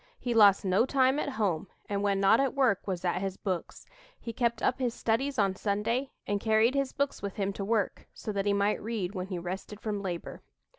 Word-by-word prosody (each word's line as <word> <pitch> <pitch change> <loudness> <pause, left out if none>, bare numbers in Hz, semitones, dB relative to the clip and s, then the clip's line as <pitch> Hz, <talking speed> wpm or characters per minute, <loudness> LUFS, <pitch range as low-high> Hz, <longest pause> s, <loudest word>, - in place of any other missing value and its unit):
He 245 - -2
lost 205 -3 +6
no 195 +6 +3
time 265 +1 +3
at 290 - -1
home, 200 - -1 0.2
and 200 -1 -1
when 200 -1 +1
not 195 +3 +5
at 275 0 +1
work 255 -9 +2
was 185 -2 -3
at 180 +1 0
his 195 -1 -3
books. 185 -4 -4 0.3
He 230 - -6
kept 235 -1 0
up 250 - +1
his 245 -2 -1
studies 265 +5 0
on 195 -3 +2
Sunday, 225 +7 -1 0.2
and 205 0 -1
carried 220 +2 +3
his 275 -1 0
books 280 0 -2
with 200 -1 -4
him 200 -1 -1
to 195 - -4
work, 210 -1 -1
so 215 - -6
that 200 0 -1
he - - +4
might 200 +1 +1
read 205 -4 -3
when 185 -2 -4
he 190 -2 -4
rested 185 +4 -6
from 210 -2 -3
labor." 175 -3 -5
205 Hz, 225 wpm, -29 LUFS, 195-235 Hz, 0.3 s, lost